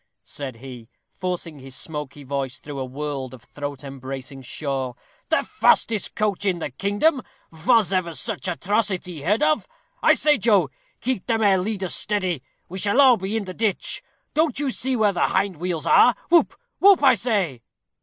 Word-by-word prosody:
said 135 -4 -6
he, 125 -1 -11 0.2
forcing 175 -4 -5
his 130 0 -8
smoky 150 -2 -5
voice 135 -1 -3
through 145 -2 -8
a 130 - -2
world 135 -1 -5
of 120 - -17
throat 145 +3 -7
embracing 135 0 -7
shawl; 130 -1 -4 0.3
"the - - +2
fastest 220 -3 +2
coach 210 -3 0
in 190 -3 +1
the 160 - -4
kingdom: 205 - +1 0.3
vos 195 +6 +3
ever 170 -3 -1
such 220 -1 -3
atrocity 180 -2 -1
heard 205 - +1
of? 305 0 +2 0.3
I - - +5
say, 300 -2 +3
Joe, 195 - +3 0.3
keep 255 -6 -2
them 225 -2 +1
ere 195 -2 +4
leaders 190 -1 -2
steady; 185 -8 0 0.3
we 190 +2 -6
shall 205 +7 +2
all 260 -4 +7
be 195 +3 -2
in 210 - -3
the 185 - -6
ditch. 215 -1 -1 0.3
Don't 310 -2 +1
you 285 -2 0
see 260 +1 -1
where 215 -4 +2
the - - +2
hind 190 -2 0
wheels 170 -2 -3
are? 245 - +6 0.2
Who 340 -1 +6 0.3
whoop, 390 -5 +6
I 265 -2 +7
say." 200 - -1
185 Hz, 175 wpm, -23 LUFS, 140-220 Hz, 0.3 s, all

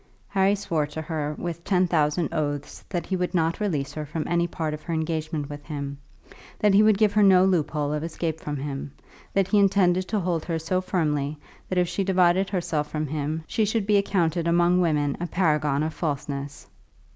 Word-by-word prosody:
Harry 195 0 +3
swore 165 -7 -1
to 150 +2 -7
her 150 -2 -3
with 170 -1 -5
ten 185 -1 +2
thousand 160 -1 +1
oaths 145 -3 -3
that 175 -3 -2
he 190 - -1
would 180 0 -2
not 165 -1 +1
release 155 -10 -1
her 155 - -4
from 150 +1 -4
any 170 0 +1
part 160 -3 -3
of 150 - -6
her 165 - -3
engagement 155 -2 -2
with 145 0 -8
him, 140 -2 -5 0.6
that 210 -2 +3
he 200 - +7
would 215 -1 +5
give 210 -1 +3
her 210 - +4
no 190 -2 +6
loophole 150 -5 0
of 150 0 -2
escape 165 -1 -3
from 150 -2 -4
him, 140 0 -5 0.4
that 195 -1 +1
he 210 - +4
intended 185 -2 +3
to 215 - 0
hold 175 -3 -1
her 165 -2 -2
so 185 +3 -1
firmly 150 -5 -1 0.3
that 185 - -1
if 180 -1 +3
she 195 - -1
divided 185 0 +3
herself 160 -6 -1
from 155 0 -2
him, 155 +2 -3
she 220 - 0
should 215 0 0
be 205 0 +4
accounted 170 -4 +1
among 175 +1 +3
women 150 -4 +1
a 175 - -2
paragon 150 -5 +1
of 160 0 -2
falseness. 140 -2 -4
165 Hz, 205 wpm, -25 LUFS, 150-185 Hz, 0.6 s, he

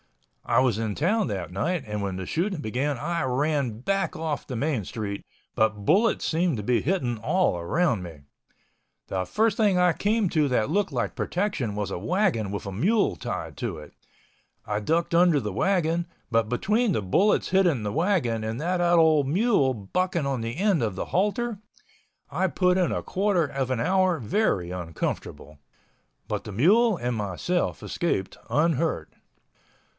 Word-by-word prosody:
I 115 - +2
was 125 -5 +2
in 110 -3 -2
town 205 +7 +1
that 95 -6 -4
night, 150 - -1
and 105 -1 -4
when 100 -2 -3
the 95 - -5
shooting 180 - -1
began 135 +3 -1
I 170 +6 -2
ran 135 -3 0
back 195 +6 -1
off 155 -3 -3
the 130 - -5
main 130 -2 -1
street, 100 0 -5 0.3
but 105 -2 +1
bullets 220 - +3
seemed 165 -4 +1
to 105 - -4
be 120 +1 +2
hitting 130 - -1
all 150 - +1
around 115 - 0
me. 85 -5 -9 0.9
The 95 -1 -2
first 215 - +1
thing 205 -5 +3
I 180 -1 +4
came 210 +2 +1
to 155 -2 +2
that 125 +1 +1
looked 200 -1 +1
like 125 -3 -2
protection 175 - -2
was 105 -1 -3
a - - -3
wagon 165 - 0
with 100 - -5
a 100 - -4
mule 200 - +1
tied 85 -10 -5
to 110 -9 -3
it. 75 - -12 0.7
I 105 0 -1
ducked 165 +9 0
under 170 -3 +5
the 105 -6 -4
wagon—but 165 - 0
between 210 - +1
the 110 - -1
bullets 190 - +2
hitting 175 - +2
the 105 - -2
wagon 155 - +1
and 110 +2 -3
that 175 +3 0
old 160 -5 +4
mule 175 - +2
bucking 170 - -1
on 135 -3 -1
the 115 +4 -4
end 195 -5 +2
of 105 -5 -1
the - - -3
halter, 210 +4 0 0.7
I 190 - +1
put 180 +1 +2
in 180 - +1
a - - -2
quarter 190 -3 +1
of 135 -3 -3
an 130 -3 -1
hour 185 +4 +2
very 105 - 0
uncomfortable. 80 -4 -5 0.7
But - - -3
the - - -7
mule 200 - +4
and 125 -3 -2
myself 105 - -2
escaped 95 - -2
unhurt. 155 - 0
145 Hz, 170 wpm, -26 LUFS, 110-180 Hz, 0.9 s, under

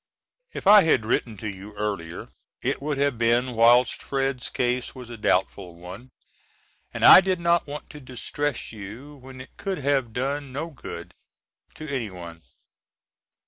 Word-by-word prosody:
If - - -7
I 205 +1 +9
had 145 - +2
written 115 -1 -1
to 110 - -6
you 100 +1 -8
earlier 100 -6 -4 0.3
it - - -1
would 145 0 -2
have 140 -4 0
been 120 +2 +2
whilst 120 +2 +4
Fred's 135 -2 -2
case 125 0 -1
was 125 -2 -10
a - - -6
doubtful 90 -3 -1
one, 90 +9 -11 0.8
and - - 0
I - - +11
did 185 -1 -1
not 170 -1 +2
want 145 +1 -7
to 150 - -10
distress 130 +2 -3
you 115 +8 -10
when 130 0 -12
it 130 - -12
could 195 -1 -3
have 135 -4 0
done 135 +3 -3
no 155 +6 -5
good 140 - -9 0.6
to 155 - -8
anyone. 90 - -6
125 Hz, 155 wpm, -25 LUFS, 110-145 Hz, 0.8 s, I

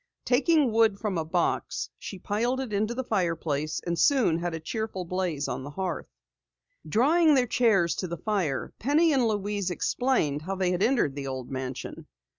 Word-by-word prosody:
Taking 280 +1 +3
wood 220 -2 +3
from 205 -6 -1
a - - -1
box, 170 +2 -1
she 195 - -7
piled 230 +7 -1
it 255 -5 -4
into 215 +4 0
the 260 - -2
fireplace, 165 - -1
and 170 -1 -1
soon 230 - +3
had 175 -1 -2
a - - -4
cheerful 190 +2 -4
blaze 175 -5 -2
on - - -4
the 140 - -7
hearth. 185 +4 -4 0.8
Drawing 305 +7 +4
their 255 -2 +3
chairs 215 -8 +3
to 185 - -2
the 170 0 -5
fire, 180 -7 -2
Penny 305 +6 +3
and 255 -4 +3
Louise 205 -2 -1
explained 180 - 0
how 190 +5 -4
they 185 -1 0
had 180 +1 -1
entered 225 - +2
the 140 -1 -5
old 130 -1 -5
mansion. 130 -1 -6
195 Hz, 180 wpm, -27 LUFS, 165-235 Hz, 0.8 s, Drawing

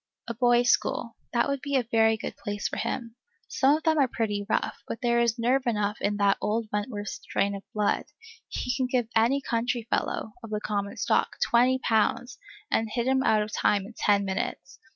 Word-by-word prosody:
A 235 - -3
boys' 240 +1 +4
school, 230 -1 -1 0.2
that 235 -1 +2
would 280 -1 -2
be 280 -1 -2
a 260 - +3
very 225 -1 +3
good - - -6
place 205 0 -3
for - - -5
him; 230 -2 -3 0.3
some 280 +3 +3
of 315 - -11
them 315 -2 +3
are 275 - +4
pretty 205 -4 -2
rough, - - -1
but - - -4
there 235 0 +3
is 235 0 +2
nerve 250 +3 +1
enough 210 -2 -1
in 205 0 0
that 200 -1 +3
old 220 +1 -1
Wentworth 205 -1 -3
strain 200 +1 -2
of 200 - -6
blood; 210 -1 0 0.4
he 250 - -2
can 255 - 0
give 250 -2 0
any 235 +5 +3
country 235 -1 -1
fellow, 220 - -1
of 225 - -8
the 210 0 -2
common 200 -1 -3
stock, - - +1
twenty 250 +2 +4
pounds, 230 +2 +1 0.3
and 225 0 +1
hit 235 +2 -1
him 265 0 +2
out 215 -5 +3
of 210 0 -8
time 200 -2 +2
in 225 - -11
ten 200 -1 +2
minutes. 185 -1 -4
230 Hz, 205 wpm, -27 LUFS, 210-245 Hz, 0.4 s, boys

